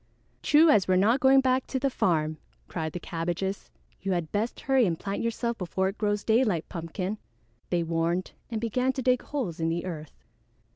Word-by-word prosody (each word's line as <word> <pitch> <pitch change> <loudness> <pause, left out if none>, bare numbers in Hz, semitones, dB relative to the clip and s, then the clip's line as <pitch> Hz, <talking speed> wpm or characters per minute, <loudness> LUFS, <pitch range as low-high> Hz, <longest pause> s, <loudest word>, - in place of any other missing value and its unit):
"True 310 +2 +5
as 200 -7 +4
we're 185 - +3
not 215 +8 +4
going 270 +1 +6
back 260 0 +1
to 265 - -2
the 270 +1 0
farm," 155 -7 0 0.3
cried 160 -3 -4
the 180 - -4
Cabbages. 175 +4 -3 0.3
"You 195 0 -1
had 170 -3 -2
best 215 +3 -2
hurry 265 -4 +3
and 165 -2 -1
plant 200 0 -3
yourself 230 0 -2
before 190 +1 0
it 195 - -9
grows 205 -1 0
daylight, 220 -7 +2
Pumpkin," 185 +4 -4 0.5
they 175 -1 +1
warned 165 +2 -1 0.2
and 225 -2 -2
began 250 +4 0
to 260 - -4
dig 255 0 +3
holes 230 - -4
in 165 0 +1
the 170 +2 -2
earth. 155 - -8
195 Hz, 190 wpm, -27 LUFS, 170-245 Hz, 0.5 s, going